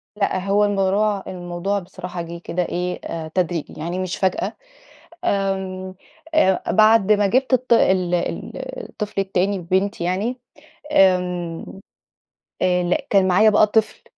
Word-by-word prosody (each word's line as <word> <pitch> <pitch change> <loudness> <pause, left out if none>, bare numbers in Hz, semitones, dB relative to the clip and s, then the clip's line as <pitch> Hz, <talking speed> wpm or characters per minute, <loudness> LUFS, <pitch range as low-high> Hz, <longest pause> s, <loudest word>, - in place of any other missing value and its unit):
لأ، 200 -2 0
هو 205 +1 +3
الموضوع 200 0 +1
الموضوع 180 +2 -3
بصراحة 180 -1 -7
جِه 170 0 -7
كده 180 +1 -1
إيه 180 +1 -3
آآ 165 -1 -5
تدريجي، 175 -3 -1
يعني 170 +4 -3
مش 185 -2 -3
فجأة. 190 -1 0 0.7
آمم، 190 - -2 0.4
آآ، 190 -12 +3
بعد 215 0 +5
ما 205 -1 +3
جِبت 255 +7 +1
الط 255 -1 0
ال 185 -6 +3
ال 175 - -3 0.4
الطفل 210 -2 -4
التاني 195 +1 0
بنتي 185 +2 -1
يعني 200 +8 -1 0.6
آمم، 180 - +2 1.0
آآ، 180 -1 +2
لأ، 275 - -1
كان 195 -2 +4
معايا 210 +4 +5
بقى 210 0 +5
طفل 220 +1 0
190 Hz, 135 wpm, -21 LUFS, 180-205 Hz, 1.0 s, بعد